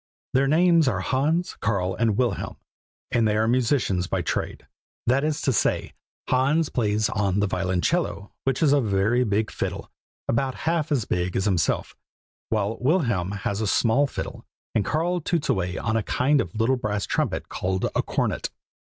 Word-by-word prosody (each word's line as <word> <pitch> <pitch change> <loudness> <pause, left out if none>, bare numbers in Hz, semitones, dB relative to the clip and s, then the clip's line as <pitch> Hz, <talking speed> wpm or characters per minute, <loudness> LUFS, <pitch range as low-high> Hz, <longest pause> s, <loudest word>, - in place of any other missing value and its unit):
Their 135 +1 +3
names 165 +1 +4
are 100 -7 +1
Hans, 155 - 0
Karl, 95 -4 0
and 110 -3 +1
Wilhelm; 120 -7 -1 0.5
and 120 -3 +3
they 105 0 +1
are 110 +1 +2
musicians 115 -7 +1
by 90 -1 -1
trade; - - -3 0.4
that 130 +4 +2
is 155 0 0
to 135 - +1
say, - - 0 0.3
Hans 140 +5 +2
plays 105 -2 +1
on 100 -1 0
the 100 - +2
violoncello, 95 - -1
which 135 +4 0
is 145 -2 +5
a 145 - +4
very 110 +3 +2
big 110 -1 0
fiddle, - - -4 0.4
about 130 +2 0
half 160 -1 0
as 130 -7 +1
big 90 0 -1
as 95 - +1
himself, 90 -7 0 0.5
while 110 0 -1
Wilhelm 120 - +1
has 100 +1 -3
a 110 - 0
small 125 +7 +3
fiddle, - - -6 0.3
and 105 - +2
Karl 170 - 0
toots 165 0 -1
away 90 -1 0
on 110 -1 -1
a 115 - +2
kind 140 +7 +2
of 90 - -6
little 115 +4 +2
brass 105 -3 -2
trumpet - - -1
called 95 0 -2
a - - +3
cornet. - - -1
115 Hz, 170 wpm, -25 LUFS, 100-140 Hz, 0.5 s, is